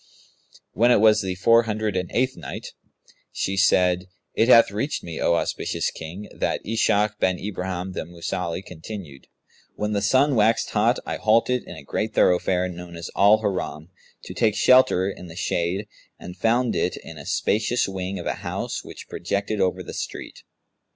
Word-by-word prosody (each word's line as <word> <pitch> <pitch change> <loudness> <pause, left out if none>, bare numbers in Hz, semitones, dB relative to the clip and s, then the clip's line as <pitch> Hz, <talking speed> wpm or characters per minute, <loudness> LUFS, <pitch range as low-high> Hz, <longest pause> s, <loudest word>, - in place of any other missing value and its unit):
When 120 +2 +3
it 125 - +5
was 110 0 +5
the 95 -2 -3
Four 115 +5 +5
Hundred 110 -2 -1
and 90 -1 -2
Eighth 130 +2 +1
Night, - - -7 0.6
She 95 - -2
said, 90 -1 +3 0.3
It 115 - +2
hath 115 -4 +7
reached 110 +9 -2
me, 85 -2 -6
O 85 - +3
auspicious - - -1
King, 85 +6 -8
that - - -2
Ishak 105 -1 +1
bin 95 -1 +1
Ibrahim 95 -2 -4
the - - -4
Mausili 85 +1 -4
continued: 85 -5 -9 0.5
"When 105 0 -2
the 100 - 0
sun 130 +7 +3
waxed 110 -1 +2
hot - - +2
I - - -3
halted 115 +3 +2
in 90 - -8
a 75 - -11
great 110 +9 -3
thoroughfare 90 0 +3
known 90 -1 -9
as 85 0 -7
Al 105 +2 +5
Haram, 90 -5 -3 0.3
to - - -8
take 110 -3 +1
shelter 125 -8 +5
in 90 -2 -6
the 80 - -11
shade 90 +1 -1 0.3
and 90 0 -9
found 115 +5 +1
it - - 0
in - - -10
a - - -10
spacious 110 +4 +1
wing 95 0 -4
of 85 - -7
a - - 0
house - - -4
which - - -11
projected 100 +3 -2
over 95 -1 0
the - - -8
street. - - -6
95 Hz, 175 wpm, -24 LUFS, 90-110 Hz, 0.6 s, hath